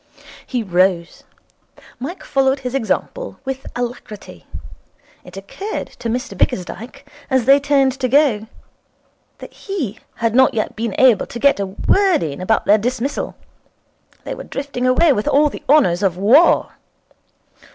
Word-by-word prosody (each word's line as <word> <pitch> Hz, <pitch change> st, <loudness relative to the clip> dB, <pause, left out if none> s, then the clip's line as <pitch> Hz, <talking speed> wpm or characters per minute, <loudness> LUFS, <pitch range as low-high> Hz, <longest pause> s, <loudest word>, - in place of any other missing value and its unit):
He 245 Hz, -3 st, -2 dB
rose. 180 Hz, -2 st, 0 dB, 0.7 s
Mike 310 Hz, +9 st, -7 dB
followed 270 Hz, 0 st, +1 dB
his 250 Hz, -1 st, -5 dB
example -, -, -3 dB
with 265 Hz, 0 st, -5 dB
alacrity. 215 Hz, -, -7 dB, 0.8 s
It -, -, -13 dB
occurred 390 Hz, -, -6 dB
to 230 Hz, -, -4 dB
Mr 245 Hz, -2 st, -3 dB
Bickersdyke, 230 Hz, +10 st, -3 dB, 0.2 s
as 260 Hz, -4 st, +1 dB
they 275 Hz, +2 st, +6 dB
turned 280 Hz, -2 st, +2 dB
to 255 Hz, -, 0 dB
go, 250 Hz, -5 st, +2 dB, 0.9 s
that -, -, -12 dB
he 310 Hz, -, -5 dB, 0.2 s
had 230 Hz, -1 st, -1 dB
not 260 Hz, 0 st, +4 dB
yet 215 Hz, -, -2 dB
been 225 Hz, -2 st, -3 dB
able 255 Hz, -5 st, +4 dB
to -, -, -8 dB
get 280 Hz, -1 st, +3 dB
in 200 Hz, -, -2 dB
a -, -, -7 dB
word 390 Hz, -, +3 dB
about 180 Hz, +8 st, -1 dB
their 210 Hz, +2 st, +4 dB
dismissal. 255 Hz, +5 st, -3 dB, 0.9 s
They -, -, -5 dB
were -, -, -8 dB
drifting 275 Hz, -3 st, -4 dB
away 280 Hz, +4 st, +4 dB
with 210 Hz, -3 st, -3 dB
all 295 Hz, +2 st, +4 dB
the -, -, -9 dB
honours 205 Hz, -, +4 dB
of 190 Hz, -3 st, 0 dB
war. 240 Hz, -, +4 dB
250 Hz, 145 wpm, -18 LUFS, 210-280 Hz, 0.9 s, they